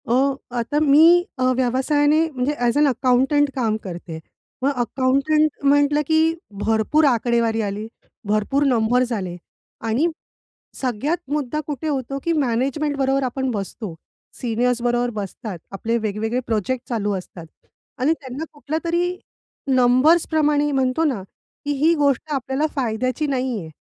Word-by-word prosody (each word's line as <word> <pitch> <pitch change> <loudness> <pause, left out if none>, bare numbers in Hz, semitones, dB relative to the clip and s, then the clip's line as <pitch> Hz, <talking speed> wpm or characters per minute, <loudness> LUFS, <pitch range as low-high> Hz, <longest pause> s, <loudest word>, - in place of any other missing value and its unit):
अ, - - +3 0.4
आता 260 +6 0
मी 320 +4 +6
अ, 255 - -1
व्यवसायाने 290 +4 +2
म्हणजे 265 0 -1
अ‍ॅज 245 -2 0
अ, - - +4
अकाउंटंट 265 +3 +2
काम 225 -5 0
करते. 170 -3 -7 0.4
मग 275 - +3
अकाउंटंट 275 +5 +2
म्हटलं 290 +1 +3
की 315 - +3 0.5
भरपूर 225 +8 +2
आकडेवारी 235 -3 +2
आली, 205 +1 -3 0.4
भरपूर 215 +7 +1
नंबर्स 245 0 +2
आले. 185 -5 -3 0.5
आणि 230 +8 +1 0.7
सगळ्यात 265 +6 -1
मुद्दा 295 -1 -1
कुठे 295 0 -4
होतो, 275 -2 -2
की 335 - +1
मॅनेजमेंटबरोबर 275 0 0
आपण 265 +1 -2
बसतो, 205 -2 -5 0.5
सीनियर्सबरोबर 240 0 0
बसतात, 195 -1 -7
आपले 225 +4 -1
वेगवेगळे 220 +2 -2
प्रोजेक्ट 235 +3 -2
चालू 210 -4 -1
असतात 180 -2 -10 0.6
आणि 295 +5 +3
त्यांना 265 +2 -6
कुठल्यातरी 335 +4 -2 0.5
नंबर्सप्रमाणे 295 +3 +3
म्हणतो 265 +2 +1
ना, 265 -10 0 0.4
की 290 - -1
ही 330 - +5
गोष्ट 290 0 +1
आपल्याला 270 +2 -1
फायद्याची 255 +3 -1
नाही 255 -4 -1
आहे. 160 -4 -8
260 Hz, 125 wpm, -21 LUFS, 230-290 Hz, 0.7 s, मी